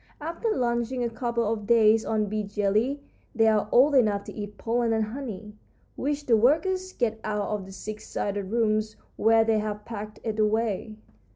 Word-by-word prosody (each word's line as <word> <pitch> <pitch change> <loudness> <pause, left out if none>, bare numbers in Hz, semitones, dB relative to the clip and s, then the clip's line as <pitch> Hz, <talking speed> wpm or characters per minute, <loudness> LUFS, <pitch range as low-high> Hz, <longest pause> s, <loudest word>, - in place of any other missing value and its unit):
After 335 +9 -3
lunching 245 - 0
a 235 - -1
couple 235 0 -1
of 210 -1 -2
days 225 -1 +5
on 215 -1 0
bee 215 +1 -2
jelly 210 +7 0 0.3
they 225 -1 +4
are 210 -1 +2
old 280 +4 +5
enough 210 -6 +3
to - - -9
eat 205 -1 -7
pollen 230 0 0
and 220 -1 +1
honey, 215 -3 -7 0.4
which 290 +1 -2
the 235 - +4
workers 370 - +2
get 225 -3 -1
out 210 -1 -2
of 205 -3 -3
the - - -10
six 215 +2 -8
sided 200 -1 -3
rooms 215 0 0 0.2
where 225 0 +4
they 220 -1 +2
have 210 0 -4
packed 215 -2 -7
it 220 -1 -3
away. 215 0 0
220 Hz, 180 wpm, -26 LUFS, 210-240 Hz, 0.4 s, days